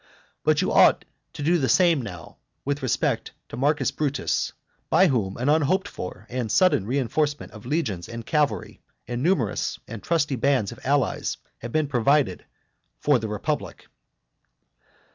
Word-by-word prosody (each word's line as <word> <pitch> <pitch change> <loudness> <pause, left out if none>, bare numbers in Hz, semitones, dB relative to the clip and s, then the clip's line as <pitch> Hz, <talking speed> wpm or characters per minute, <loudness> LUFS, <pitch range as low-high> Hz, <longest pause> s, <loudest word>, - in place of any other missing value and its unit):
And - - +4
you - - +1
ought - - +5 0.3
to 145 - -6
do 170 +3 +3
the 130 - 0
same 170 -6 +4
now 90 -8 -9 0.3
with 145 +1 -1
respect 130 -4 -1 0.2
to - - -7
Marcus 140 -1 +1
Brutus, 145 -2 -1 0.4
by 190 - +5
whom 105 -8 -1
an 125 - -2
unhoped 160 +6 +2
for 90 +2 -7
and 125 -3 -3
sudden 185 - +3
reinforcement 140 +3 -1
of 110 +1 -11
legions 120 - -2
and 115 -1 -7
cavalry, 145 - -1 0.3
and 120 0 -3
numerous 145 - 0
and 115 -3 -7
trusty 150 -5 0
bands 130 -5 +1
of 120 - -10
allies, 140 0 0 0.2
have 120 - -7
been 155 +2 +1
provided 140 +2 +2 0.5
for 145 -4 +3
the 110 - -4
republic. 105 -1 -4
135 Hz, 150 wpm, -25 LUFS, 115-150 Hz, 0.5 s, ought